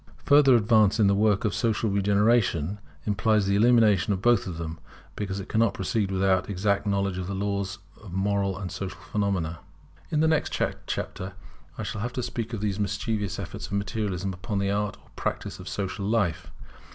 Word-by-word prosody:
Further 145 -3 +6
advance 110 -1 +4
in 105 - +5
the 100 - +4
work 105 +2 +2
of 105 - +1
social 115 -1 0
regeneration 100 -3 +2 0.3
implies 105 0 +2
the 100 +1 +2
elimination 110 -3 +4
of 95 - 0
both 120 -2 +3
of 85 -3 -5
them, 80 -1 -5 0.4
because 100 -1 -3
it 95 - -7
cannot 115 -1 +2
proceed 100 +1 -1
without 95 0 +2
exact 100 +1 0
knowledge 100 -2 0
of 90 - -4
the 100 - -3
laws 100 0 -2 0.2
of 100 -4 -11
moral 100 0 0
and 95 -2 -5
social 95 -1 -5
phenomena. 95 -6 -2 0.5
In 150 - 0
the 160 - +4
next 160 -1 +1 0.4
chapter 95 +1 -4 0.4
I - - -4
shall 110 - -4
have 120 +2 -3
to 125 - -2
speak 120 -1 -4
of 115 -4 -4
the 105 -2 0
mischievous 105 -1 -2
effects 95 -3 -6
of - - -9
Materialism 100 -2 -2
upon 100 +3 -4
the 100 0 +1
Art 105 0 -1
or - - -25
practice - - -3
of - - -7
social 100 0 -3
life. 105 -8 0
100 Hz, 190 wpm, -26 LUFS, 95-110 Hz, 0.5 s, Further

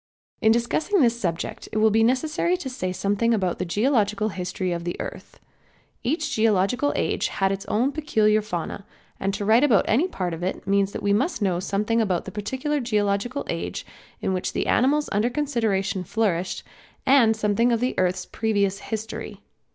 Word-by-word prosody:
In 220 - +5
discussing 240 - +1
this 235 -3 +4
subject 170 -5 -3
it - - -3
will 215 0 +4
be 225 +1 +4
necessary 310 +8 +1
to 290 -7 -5
say 185 -7 -3
something 205 +5 +1
about 185 -4 -1
the 185 - -1
geological 215 +1 +1
history 185 -1 -3
of 170 -1 -3
the 175 0 -4
earth. - - -8 0.6
Each 295 +3 -1
geological 220 +6 +2
age - - 0
had 195 0 0
its 195 0 -4
own 240 +6 +1
peculiar 215 -8 +2
fauna, 200 -1 -5 0.4
and 195 - 0
to 205 - -3
write 225 +5 +5
about 235 -10 +4
any 275 +12 +3
part 180 - -3
of 165 - -6
it 185 +2 -3
means 200 0 +2
that - - -5
we 200 0 +2
must 260 - 0
know 180 -3 +1
something 210 +5 0
about 185 -6 0
the 190 - -7
particular 260 +9 -2
geological 215 +2 -1
age - - -4 0.4
in 190 - 0
which 185 - -2
the - - -1
animals 290 +4 +2
under 210 +4 +2
consideration 225 -9 -1
flourished, 185 -2 -1 0.4
and 250 -5 +5
something 220 +3 +2
of 230 - +2
the 250 +2 0
earth's 180 0 0
previous 200 -3 0
history. 220 0 -6
215 Hz, 180 wpm, -24 LUFS, 195-245 Hz, 0.6 s, In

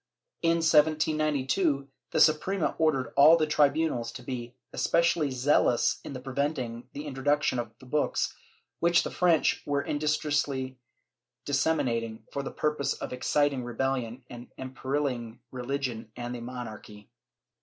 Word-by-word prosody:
In 165 0 +2
1792, 155 -1 +2 0.2
the - - 0
Suprema 155 +4 +3
ordered 145 -6 +1
all 150 +4 +8
the 155 - +2
tribunals 150 -4 +1
to 125 - -9
be 120 -1 -6 0.2
especially 170 -3 +2
zealous 130 -1 +2
in 130 - -6
preventing 130 -3 -3
the 145 +2 -6
intro 135 -2 -6
duction 145 -3 +2
of 120 -2 -3
the 130 - -15
books, 150 +3 0 0.4
which 170 +1 +4
the - - -4
French 175 -3 +2
were 145 -1 0
industriously 145 -3 -1 0.7
dissemi 145 +3 +2
nating 115 -2 -2
for 140 - -2
the 135 - -5
purpose 150 -2 -1
of - - -6
exciting 140 +1 +1
rebelHon 125 0 -2
and 120 -1 -10
imperilling 130 -3 -3
religion 125 -3 -4
and 120 0 -5
the 120 - -6
monarchy. 115 -3 -8
135 Hz, 135 wpm, -28 LUFS, 125-150 Hz, 0.7 s, all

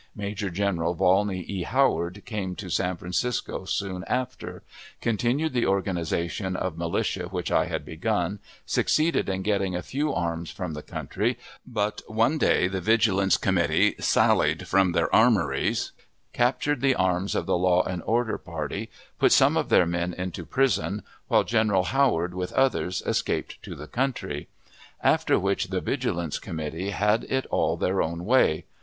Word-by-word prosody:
Major 100 -1 -3
General 90 -2 -1
Volney 95 +2 +2
E. 95 +1 -4
Howard 100 -5 +1
came 95 -5 -4
to - - -7
San 90 0 0
Francisco 95 +4 -2
soon 95 -1 -3
after; 130 0 -4 0.4
continued 120 +7 0
the 120 -2 +1
organization 95 -1 -1
of 90 -2 -2
militia 85 +2 -1
which 90 -1 -4
I - - +3
had - - -4
begun; 100 +2 -1 0.3
succeeded 155 -7 +1
in 95 0 -2
getting 95 -3 0
a 90 - -3
few 145 +3 -1
arms 85 - -2
from 90 -3 -5
the 75 - -6
country; 110 +10 -2 0.3
but 105 -4 -2
one 115 +8 +1
day 90 - +3
the 95 0 -3
Vigilance 100 -2 +3
Committee - - +2
sallied - - +2
from 95 -2 +3
their 85 -2 0
armories, 100 - +2 0.4
captured 130 +3 +1
the 135 -1 +3
arms 95 +1 0
of - - -1
the - - +1
"Law 90 0 +3
and 90 -2 -4
Order 115 +2 0
party," 85 +5 -5 0.3
put - - +4
some - - +5
of - - 0
their 90 - +5
men 85 +1 -2
into 90 -1 -5
prison, 130 -6 0 0.2
while - - +4
General 110 -5 +2
Howard, 95 -10 +1
with 90 0 -4
others, 130 -9 +1
escaped - - -2
to - - -8
the 75 - -8
country; 120 - -3 0.6
after - - +3
which 100 0 0
the 95 0 -1
Vigilance 85 - -2
Committee 80 +4 -4
had 105 +2 +1
it 130 0 -1
all - - +1
their 95 +1 +1
own 85 +2 -3
way. 110 -9 +3
95 Hz, 155 wpm, -26 LUFS, 90-115 Hz, 0.6 s, some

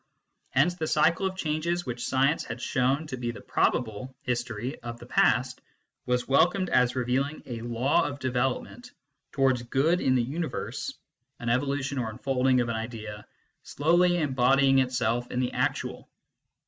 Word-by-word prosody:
Hence 150 +7 +3
the 165 -3 -3
cycle 165 +5 +3
of 190 0 -6
changes 170 +1 -1
which 120 -1 -4
science 135 +4 +2
had - - -6
shown 135 +4 0
to 130 -4 -6
be 120 -1 -3
the 115 - -6
probable 120 +2 -1
history 120 +1 -3
of 120 -1 -6
the - - -12
past - - +2 0.5
was 125 0 0
wel 140 +6 +5
comed 185 0 -3
as 125 0 +3
revealing 130 +4 -1
a 115 -2 -6
law 120 +4 +1
of 140 - -5
development 130 - -2 0.4
towards 130 -3 +2
good 140 +9 +1
in 130 - +3
the 125 - +2
universe 155 +7 -4 0.5
an 120 - -3
evolution 140 +2 0
or 115 -3 -2
unfolding 130 +2 +1
of 120 - -2
an 115 - -1
idea 110 -2 -7 0.3
slowly 175 +4 +2
embodying 135 -2 +3
itself 125 -2 0
in 125 - -2
the 125 -1 0
actual. - - -2
130 Hz, 160 wpm, -27 LUFS, 120-145 Hz, 0.5 s, wel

